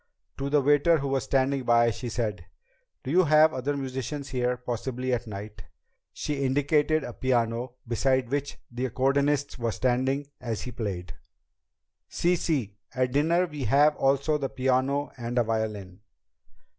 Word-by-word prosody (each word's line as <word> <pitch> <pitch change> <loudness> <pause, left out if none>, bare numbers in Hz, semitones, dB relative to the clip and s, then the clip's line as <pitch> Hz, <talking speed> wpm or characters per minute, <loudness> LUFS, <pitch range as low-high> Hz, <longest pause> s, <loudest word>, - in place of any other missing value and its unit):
To 140 +1 -2
the 145 0 +3
waiter 145 +4 +4
who 140 -2 -3
was 135 -1 0
standing 135 0 +1
by, 120 -1 +4
she 120 +3 -5
said, 105 -7 -3 0.6
"Do 130 - -4
you 180 +2 +4
have 155 +1 +5
other 140 +3 -2
musicians 135 +1 -4
here, 125 -1 0
possibly 125 +1 -3
at 120 -1 -2
night?" 105 0 -8 0.5
She 145 -2 -3
indicated 145 +3 +2
a 120 - -6
piano 120 0 -1
beside 130 +1 +1
which 145 +1 -2
the 125 +2 -2
accordionist 140 +2 +1
was 115 -2 -1
standing 130 +3 0
as 115 -4 -4
he 125 - -6
played. 95 -7 -5 1.0
"Sí, 175 +1 +1
sí! 130 - -2 0.2
At 125 -1 +1
dinner 165 +6 +2
we 150 -6 -5
have 145 +6 +4
also 140 +3 +1
the 135 -2 -2
piano 130 +2 0
and 120 +1 -4
a 120 - +4
violin." 105 -4 -3
130 Hz, 155 wpm, -27 LUFS, 120-145 Hz, 1.0 s, have